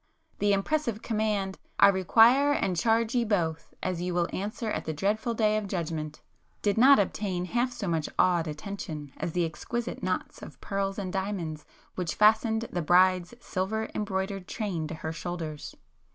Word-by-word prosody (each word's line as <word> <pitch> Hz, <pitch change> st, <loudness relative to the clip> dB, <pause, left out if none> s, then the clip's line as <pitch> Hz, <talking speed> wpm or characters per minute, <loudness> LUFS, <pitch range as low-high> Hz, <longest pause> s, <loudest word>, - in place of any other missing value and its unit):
The 205 Hz, 0 st, +3 dB
impressive 230 Hz, +2 st, 0 dB
command: 210 Hz, -4 st, -1 dB, 0.2 s
"I 200 Hz, -, +9 dB
require 230 Hz, +9 st, +5 dB
and 190 Hz, -9 st, 0 dB
charge 225 Hz, +5 st, +2 dB
ye 245 Hz, -1 st, +2 dB
both, 170 Hz, -7 st, -1 dB
as 180 Hz, -2 st, -1 dB
ye 180 Hz, +1 st, -2 dB
will 175 Hz, -1 st, +1 dB
answer 215 Hz, +3 st, -3 dB
at -, -, -3 dB
the 160 Hz, -, -2 dB
dreadful 215 Hz, +8 st, -1 dB
day 215 Hz, -1 st, +2 dB
of 210 Hz, -2 st, -3 dB
judgment,"—did 165 Hz, +3 st, -4 dB
not 265 Hz, +5 st, +7 dB
obtain 190 Hz, -2 st, -1 dB
half 240 Hz, +6 st, 0 dB
so 205 Hz, -5 st, -5 dB
much 165 Hz, -3 st, -1 dB
awed 175 Hz, -3 st, +3 dB
attention 155 Hz, -3 st, -6 dB
as 165 Hz, -, -3 dB
the 175 Hz, -1 st, +1 dB
exquisite 235 Hz, +9 st, -4 dB
knots 185 Hz, 0 st, -3 dB
of -, -, -11 dB
pearls 195 Hz, 0 st, -2 dB
and 190 Hz, -3 st, -4 dB
diamonds 190 Hz, -6 st, -3 dB, 0.3 s
which 175 Hz, -3 st, -3 dB
fastened 220 Hz, +1 st, +4 dB
the 175 Hz, -, -1 dB
bride's 180 Hz, +4 st, +3 dB
silver 220 Hz, +2 st, -2 dB
embroidered 195 Hz, -2 st, -3 dB
train 185 Hz, -8 st, -3 dB
to 160 Hz, -, -6 dB
her 160 Hz, 0 st, -5 dB
shoulders. 165 Hz, -3 st, -5 dB
195 Hz, 165 wpm, -28 LUFS, 175-220 Hz, 0.3 s, I